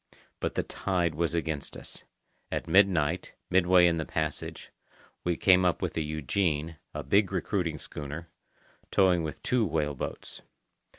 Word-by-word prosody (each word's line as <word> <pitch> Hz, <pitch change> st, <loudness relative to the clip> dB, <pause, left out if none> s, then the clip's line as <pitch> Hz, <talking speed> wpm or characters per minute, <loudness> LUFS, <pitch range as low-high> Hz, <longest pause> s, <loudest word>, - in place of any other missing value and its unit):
But -, -, -2 dB
the -, -, +1 dB
tide 90 Hz, -4 st, -1 dB
was 85 Hz, +2 st, 0 dB
against 80 Hz, -3 st, -3 dB
us. -, -, -10 dB, 0.5 s
At -, -, -2 dB
midnight, 90 Hz, -4 st, +3 dB, 0.2 s
midway 90 Hz, 0 st, +6 dB
in 85 Hz, -1 st, +3 dB
the 80 Hz, -, -1 dB
passage, 80 Hz, -2 st, -4 dB, 0.5 s
we 85 Hz, -1 st, 0 dB
came 95 Hz, -1 st, +5 dB
up 90 Hz, -2 st, +2 dB
with -, -, -2 dB
the 80 Hz, -, -1 dB
Eugenie, 80 Hz, +1 st, -1 dB
a 75 Hz, -, -5 dB
big 100 Hz, +9 st, +3 dB
recruiting 90 Hz, -4 st, -1 dB
schooner, 75 Hz, +3 st, -7 dB, 0.6 s
towing 90 Hz, -3 st, +4 dB
with 80 Hz, -2 st, -5 dB
two 125 Hz, -2 st, +2 dB
whale 75 Hz, -6 st, 0 dB
boats. 65 Hz, -, -6 dB
85 Hz, 145 wpm, -29 LUFS, 75-90 Hz, 0.6 s, midway